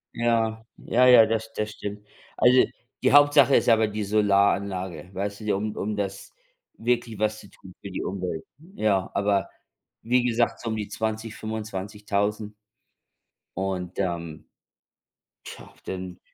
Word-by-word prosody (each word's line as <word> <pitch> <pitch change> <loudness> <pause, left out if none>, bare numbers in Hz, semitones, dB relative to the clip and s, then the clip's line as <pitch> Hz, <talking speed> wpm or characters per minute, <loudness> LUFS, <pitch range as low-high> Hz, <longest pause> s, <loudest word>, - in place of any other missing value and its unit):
Ja, 115 -1 0
ja, 125 +2 +3
ja, 125 -3 +9
das 110 0 -2
das 105 0 -3
stimmt. 105 0 -7 0.3
Also, 125 +1 +5 0.4
die - - +3
Hauptsache 145 -1 +6
ist - - +3
aber 110 -2 +5
die 105 0 -3
Solaranlage, 100 -4 +1
weißt 100 +1 -4
du, - - -10
die 105 - +1
um 105 +2 -2
um 105 +1 -3
das 100 -1 -4 0.5
wirklich 120 -1 -1
was 110 +1 -1
zu 100 - -14
tun 95 0 -15
für 100 - -7
die 95 - -4
Umwelt. 90 -4 -4 0.3
Ja, 100 -3 +1
aber 100 -1 +1 0.5
wie 125 +2 +2
gesagt, 120 -1 +1
so 115 - -4
um 110 - -1
die 105 -2 -4
20.000, 110 +1 -4
25.000. 105 0 -3 1.0
Und, 95 -2 -3
ähm, 85 -4 -3 1.0
tja, - - -11
denn, 90 -1 -6
105 Hz, 145 wpm, -25 LUFS, 95-110 Hz, 1.0 s, ja